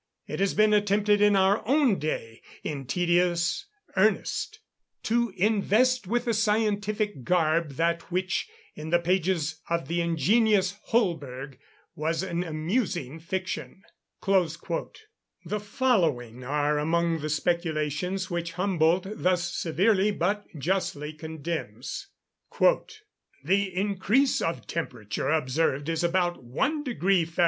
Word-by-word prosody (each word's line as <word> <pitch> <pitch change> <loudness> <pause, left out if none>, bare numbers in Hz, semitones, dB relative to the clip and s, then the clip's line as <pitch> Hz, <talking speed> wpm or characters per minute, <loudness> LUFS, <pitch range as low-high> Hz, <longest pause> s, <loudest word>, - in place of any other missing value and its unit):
It - - -5
has 195 0 +1
been 215 0 +4
attempted 205 0 +3
in 205 -1 +5
our 195 +2 +3
own 270 -6 +3
day, 115 -7 -4 0.2
in 140 -4 -4
tedious 175 - +1 0.3
earnest, - - +1 0.4
to 235 0 +1
invest 215 +3 +2
with 240 +4 0
a 235 - +1
scientific 210 - 0
garb 160 -1 +1
that 170 +5 -1
which, 185 - -1 0.2
in 155 +1 -7
the 175 - +4
pages 170 -3 0
of 170 0 -1
the 170 +1 0
ingenious 195 - +2
Holberg, 145 - -1 0.4
was 160 +3 -1
an 175 -2 -2
amusing 165 - -2
fiction." 190 +3 -5 0.4
The 190 - -2
following 170 - 0
are 150 +2 +1
among 165 +2 +1
the 155 +1 -4
speculations 170 +3 -1
which 170 -1 -3
Humboldt 180 -1 +2
thus 175 -1 0
severely 190 +5 +2
but 205 +1 -1
justly 150 -2 -1
condemns: 160 - -5 0.5
"The 425 - 0
increase 205 +8 +1
of 165 - -2
temperature 120 -12 -3
observed 150 0 +1
is 165 +1 -1
about 175 -1 0
1 270 - -1
deg. 245 -8 -5 0.2
Fahr. 165 - -11
175 Hz, 115 wpm, -27 LUFS, 160-205 Hz, 0.5 s, in